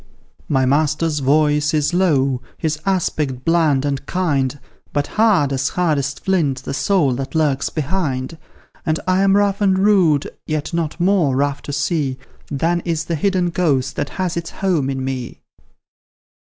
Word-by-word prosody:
"My 135 -2 +2
master's 155 +3 +1
voice 150 +3 +2
is 150 +3 +1
low, 140 -8 +2 0.2
his 155 -1 -2
aspect 150 -8 -1
bland 160 -5 +2
and 140 -1 -2
kind, 145 -7 0 0.3
But 145 -1 0
hard 195 -11 +2
as 135 +1 0
hardest 150 -6 -1
flint 150 -9 +1
the - - -4
soul 150 -2 +2
that 135 +3 -5
lurks 145 -4 +1
behind; 155 -2 -2 0.4
And 160 -1 0
I 185 +1 +3
am 195 0 +4
rough 200 0 +1
and 190 -2 +3
rude, 185 -8 +3 0.2
yet 155 +1 -3
not 165 0 -2
more 175 -7 +2
rough 140 +1 0
to - - -7
see 145 -2 -1 0.3
Than 165 +5 0
is 165 -2 -2
the 170 - -2
hidden 180 +1 0
ghost 135 -7 0
that 145 - -2
has 185 -3 -1
its 170 -1 -4
home 175 -8 0
in 130 -1 -3
me." 130 -2 -5
155 Hz, 155 wpm, -19 LUFS, 140-175 Hz, 0.4 s, am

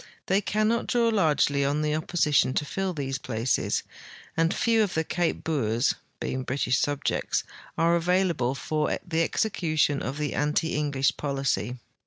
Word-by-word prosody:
They 195 +2 +2
cannot 215 +3 0
draw 235 -1 +2
largely 150 -8 +2
on 145 +2 0
the 150 0 0
opposition 150 -4 +2
to 150 - 0
fill 190 +5 -2
these 135 -5 -3
places, 120 0 -1 0.5
and 165 +1 +2
few 230 -1 +2
of 205 -4 0
the 160 - +1
Cape 170 +1 -1
Boers, 125 -5 +1 0.3
being 130 - -2
British 130 -1 0
subjects, 145 -1 0 0.3
are 170 +1 +3
available 170 -7 +1
for 150 +3 -1
the 165 -1 +1
execution 155 -6 +1
of 135 +4 -4
the 150 -1 -2
anti 150 +2 0
English 140 -2 0
policy. 135 -6 -1
150 Hz, 150 wpm, -26 LUFS, 140-175 Hz, 0.5 s, are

